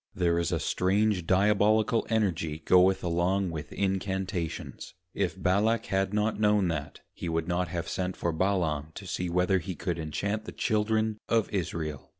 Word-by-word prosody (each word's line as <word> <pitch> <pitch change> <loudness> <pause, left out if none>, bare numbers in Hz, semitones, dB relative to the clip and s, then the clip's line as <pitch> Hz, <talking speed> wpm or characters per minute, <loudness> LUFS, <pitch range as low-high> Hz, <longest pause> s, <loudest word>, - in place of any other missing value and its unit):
There 85 -2 +2
is 85 - -1
a - - 0
strange 95 -1 +1
Diabolical 105 +3 +3
Energy 85 -8 0
goeth 95 +1 +4
along 90 +2 +1
with 80 -2 -6
Incantations. 95 -5 -3 0.2
If 95 -1 -2
Balak 105 +5 +2
had 95 0 0
not 105 +1 0
known 105 -3 +3
that 75 -3 -4
he 85 - -5
would 80 0 -1
not 90 0 0
have 85 0 -4
sent 90 0 -3
for 85 - -1
Balaam, 80 -4 0
to 100 - -8
see 90 0 -3
whether 90 +2 +2
he 90 +1 -5
could 85 -1 -3
inchant 100 +7 -2
the - - -7
Children 110 -1 0
of 115 -2 +2
Israel. 80 -6 -3
95 Hz, 160 wpm, -28 LUFS, 85-105 Hz, 0.2 s, goeth